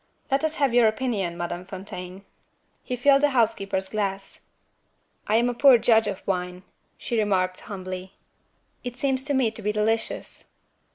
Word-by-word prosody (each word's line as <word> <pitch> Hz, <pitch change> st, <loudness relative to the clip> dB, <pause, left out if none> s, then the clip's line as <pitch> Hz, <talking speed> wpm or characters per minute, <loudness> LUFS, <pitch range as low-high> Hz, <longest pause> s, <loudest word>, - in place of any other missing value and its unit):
"Let 275 Hz, +3 st, +2 dB
us 315 Hz, 0 st, 0 dB
have 275 Hz, -4 st, +1 dB
your 240 Hz, -2 st, +6 dB
opinion, 215 Hz, -7 st, -1 dB
Madame 175 Hz, +1 st, -4 dB
Fontaine." 185 Hz, 0 st, -9 dB, 0.6 s
He 250 Hz, -, -3 dB
filled 275 Hz, +3 st, +4 dB
the 295 Hz, -, +4 dB
housekeeper's 195 Hz, -4 st, +1 dB
glass. 200 Hz, -2 st, -3 dB, 0.9 s
"I 215 Hz, -, +2 dB
am 235 Hz, +2 st, +3 dB
a 245 Hz, -, 0 dB
poor 265 Hz, +1 st, +7 dB
judge 225 Hz, -1 st, +3 dB
of 195 Hz, -2 st, -5 dB
wine," 180 Hz, -1 st, -3 dB, 0.3 s
she 235 Hz, -, -2 dB
remarked 185 Hz, -3 st, 0 dB
humbly. 185 Hz, -1 st, -7 dB, 0.7 s
"It 245 Hz, 0 st, -6 dB
seems 265 Hz, -2 st, 0 dB
to 290 Hz, -1 st, 0 dB
me 250 Hz, -4 st, +2 dB
to 220 Hz, -, -8 dB
be 210 Hz, 0 st, 0 dB
delicious." 220 Hz, +2 st, -2 dB
215 Hz, 160 wpm, -25 LUFS, 190-245 Hz, 0.9 s, poor